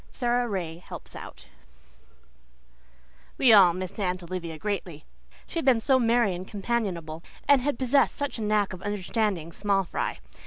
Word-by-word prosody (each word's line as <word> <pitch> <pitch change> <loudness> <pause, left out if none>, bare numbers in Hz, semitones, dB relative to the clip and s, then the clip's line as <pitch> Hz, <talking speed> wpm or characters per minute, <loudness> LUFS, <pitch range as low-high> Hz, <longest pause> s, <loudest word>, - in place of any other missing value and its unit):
SARA 245 -1 0
RAY 170 -5 -3
HELPS - - -10
OUT - - -10 1.9
We 245 -4 +6
all 190 -4 +8
missed 185 +3 -6
Aunt 185 -2 -1
Olivia 170 -2 -5
greatly; 180 -5 -4 0.4
she 335 - -4
had 325 - -4
been 255 -4 +5
so 260 +3 +3
merry 235 -4 +3
and 180 +2 -6
companionable, 190 -7 -3 0.3
and 280 -2 +6
had 285 -1 -1
possessed 265 +1 +2
such 285 -4 -3
a - - -3
knack 210 -2 +1
of 185 - -9
understanding 205 -4 -1
small 195 +2 +1
fry. 175 - -3
205 Hz, 155 wpm, -27 LUFS, 180-240 Hz, 1.9 s, all